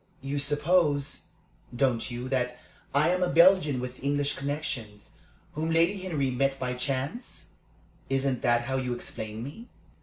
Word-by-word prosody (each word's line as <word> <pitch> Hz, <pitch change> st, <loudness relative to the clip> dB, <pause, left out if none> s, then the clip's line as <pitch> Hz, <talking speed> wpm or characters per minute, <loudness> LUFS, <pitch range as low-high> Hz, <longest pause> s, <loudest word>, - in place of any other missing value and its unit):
You 140 Hz, +1 st, -2 dB
suppose, 145 Hz, 0 st, +1 dB, 0.5 s
don't 125 Hz, -2 st, +1 dB
you, 120 Hz, +1 st, -5 dB
that 125 Hz, -2 st, 0 dB, 0.3 s
I 145 Hz, +4 st, +3 dB
am 180 Hz, +1 st, +1 dB
a 180 Hz, -, +2 dB
Belgian 170 Hz, -5 st, +5 dB
with 125 Hz, +1 st, -6 dB
English 145 Hz, +1 st, +1 dB
connections, 135 Hz, -7 st, -4 dB, 0.4 s
whom 160 Hz, +2 st, -2 dB
Lady 170 Hz, +5 st, +3 dB
Henry 155 Hz, -8 st, -1 dB
met 135 Hz, +2 st, +1 dB
by 125 Hz, -1 st, -2 dB
chance? 135 Hz, -, -3 dB, 0.6 s
Isn't 135 Hz, -2 st, 0 dB
that 120 Hz, 0 st, +3 dB
how 130 Hz, +2 st, -1 dB
you 125 Hz, -2 st, -1 dB
explain 110 Hz, -2 st, -5 dB
me?" 155 Hz, -, -9 dB
140 Hz, 145 wpm, -28 LUFS, 125-155 Hz, 0.6 s, Belgian